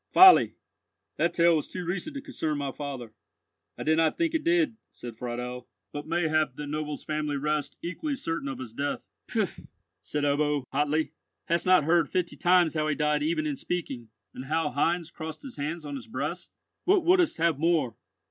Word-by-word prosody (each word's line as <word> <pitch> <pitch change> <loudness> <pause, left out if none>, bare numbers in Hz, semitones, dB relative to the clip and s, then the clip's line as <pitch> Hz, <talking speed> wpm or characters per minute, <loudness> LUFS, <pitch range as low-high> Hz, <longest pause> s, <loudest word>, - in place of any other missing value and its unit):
"Folly! 375 0 +8 0.6
That - - +2
tale 170 0 +4
was 155 - -1
too 180 -1 -5
recent 195 - -3
to 280 - -5
concern 155 - -2
my 140 -1 -2
father." 130 -6 -6 0.6
"I - - -4
did 160 +1 +3
not 160 -1 +2
think 330 -1 +1
it 320 -1 0
did," 335 -8 +2
said 120 -2 -9
Friedel; 125 +1 -5 0.3
"but 145 +1 -5
mayhap 155 -4 +1
that 150 - -5
noble's 150 0 -4
family 150 -2 -2
rest 145 -1 -1
equally 275 - -2
certain 165 - -3
of 135 -2 -4
his 120 -4 -8
death." 140 +4 -3 0.2
"Pfui!" - - -2 0.3
said 150 +6 -3
Ebbo, 145 0 +2
hotly; 150 +3 +1 0.3
"hast 170 +2 0
not 185 -4 +6
heard 165 +2 +3
fifty 180 -2 -1
times 175 -2 +4
how 155 -1 0
he 150 - +1
died 150 -1 +1
even 155 0 0
in 145 -3 -2
speaking, 130 -10 -4 0.2
and 130 - -7
how 155 +1 0
Heinz 170 +3 0
crossed 160 -1 -7
his 270 -3 -9
hands 155 +3 -3
on 145 - -5
his 140 - -6
breast? 225 - -4 0.3
What 370 -2 +4
wouldst 355 -2 +4
have 165 -3 +2
more?" 160 -7 +2
155 Hz, 185 wpm, -28 LUFS, 145-175 Hz, 0.6 s, Folly